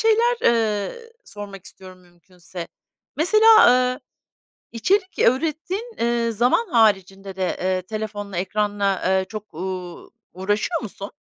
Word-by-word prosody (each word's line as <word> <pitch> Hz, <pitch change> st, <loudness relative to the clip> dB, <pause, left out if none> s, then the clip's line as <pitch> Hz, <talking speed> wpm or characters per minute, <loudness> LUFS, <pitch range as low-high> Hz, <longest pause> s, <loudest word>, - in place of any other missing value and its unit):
şeyler, 455 Hz, +2 st, +3 dB
eee, 225 Hz, -, 0 dB
sormak 200 Hz, -2 st, -10 dB
istiyorum 185 Hz, -1 st, -13 dB
mümkünse. 175 Hz, 0 st, -11 dB, 0.5 s
Mesela, 435 Hz, +7 st, +6 dB
eee, 250 Hz, 0 st, +2 dB, 0.7 s
içerik 370 Hz, -, 0 dB
ürettiğin, 325 Hz, -, 0 dB
eee, 235 Hz, 0 st, +1 dB
zaman 245 Hz, -, +2 dB
haricinde 195 Hz, -, +1 dB
de, 185 Hz, -1 st, -1 dB
eee, 185 Hz, 0 st, 0 dB
telefonla, 205 Hz, -1 st, -6 dB
ekranla, 200 Hz, +1 st, -1 dB
eee, 190 Hz, 0 st, +2 dB
çok, 215 Hz, -4 st, -9 dB
ııı, 180 Hz, 0 st, -6 dB, 0.2 s
uğraşıyor 205 Hz, -, -1 dB
musun? 200 Hz, -2 st, -8 dB
210 Hz, 110 wpm, -22 LUFS, 190-260 Hz, 0.7 s, Mesela